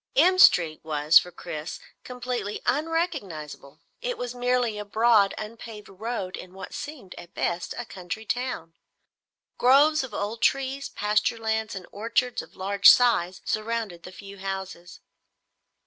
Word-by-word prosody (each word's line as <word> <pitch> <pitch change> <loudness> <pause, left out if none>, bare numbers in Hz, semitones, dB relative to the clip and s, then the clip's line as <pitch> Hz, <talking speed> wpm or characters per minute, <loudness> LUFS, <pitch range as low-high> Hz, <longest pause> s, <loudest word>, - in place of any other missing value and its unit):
M 370 -5 +5
Street 165 - +5
was, 155 0 +5
for 180 - -8
Chris, 160 -2 -7 0.2
completely 245 -4 -4
unrecognizable. 250 - -3 0.2
It - - -3
was 245 -1 -4
merely 245 -3 0
a - - -4
broad 215 -1 +3
unpaved 215 0 -8
road 195 -1 -4
in 185 0 -11
what 190 - -9
seemed, 285 -10 -8
at 170 - -13
best, 175 0 -2
a 240 - -4
country 190 +2 -7
town. 240 -10 -3 0.9
Groves 285 +4 +5
of 260 - -7
old 210 +3 -4
trees, 275 +2 0
pasture 210 +2 0
lands 220 -1 -2
and 185 -2 -7
orchards 235 +4 -1
of - - -16
large 200 +1 +5
size 190 -8 +4
surrounded 215 -5 -2
the 180 - -10
few 200 +1 -11
houses. 190 -2 -6
215 Hz, 140 wpm, -26 LUFS, 185-245 Hz, 0.9 s, M